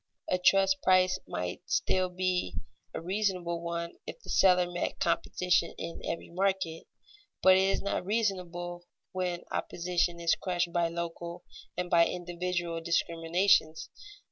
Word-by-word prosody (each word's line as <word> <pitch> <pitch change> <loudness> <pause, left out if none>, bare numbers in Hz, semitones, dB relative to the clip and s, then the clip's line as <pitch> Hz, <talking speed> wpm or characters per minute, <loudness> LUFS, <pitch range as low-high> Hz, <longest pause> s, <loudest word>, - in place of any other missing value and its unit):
A 185 - +2
trust's 195 +1 +4
price 185 0 +4
might 90 0 -4
still 185 -1 +1
be 180 - -1 0.4
a - - -4
reasonable 180 -2 -1
one 170 0 -4
if - - -7
the - - -9
seller 180 -2 +5
met 175 0 -3
competition 170 +1 +1
in 165 0 -6
every 170 - -4
market; 185 -3 -1 0.6
but 185 0 +8
it 190 +1 +3
is - - 0
not 200 - -1
reasonable 180 -4 -2 0.2
when 180 -2 -2
opposition 175 0 -1
is 170 -1 +3
crushed 175 -2 -1
by 175 -1 +2
local 170 +1 -5 0.3
and 180 0 -1
by 170 -1 +5
individual 175 -1 -3
discriminations. 165 0 +1
175 Hz, 135 wpm, -30 LUFS, 170-185 Hz, 0.6 s, but